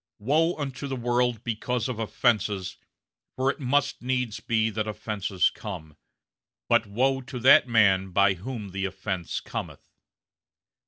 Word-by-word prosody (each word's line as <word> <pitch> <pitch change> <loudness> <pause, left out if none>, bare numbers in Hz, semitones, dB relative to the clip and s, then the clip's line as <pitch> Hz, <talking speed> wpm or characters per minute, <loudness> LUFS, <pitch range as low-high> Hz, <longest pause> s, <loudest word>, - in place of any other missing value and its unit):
'Woe 155 +10 +1
unto 140 -1 -4
the 135 - -3
world 120 -1 0
because 120 +1 -2
of 125 -3 -4
offenses! 105 -4 0 0.6
for 130 +1 +2
it - - -12
must 140 0 0
needs 125 -3 -1
be 110 -1 0
that 110 0 -2
offenses 105 -2 0
come; 80 -8 -8 0.7
but - - +3
woe 135 +6 +1
to 125 0 -8
that 130 +3 +6
man 100 -5 +3
by 100 +2 +4
whom 105 +2 -6
the 100 +1 -2
offense 95 -2 -3
cometh.' - - -7
115 Hz, 140 wpm, -26 LUFS, 100-130 Hz, 0.7 s, that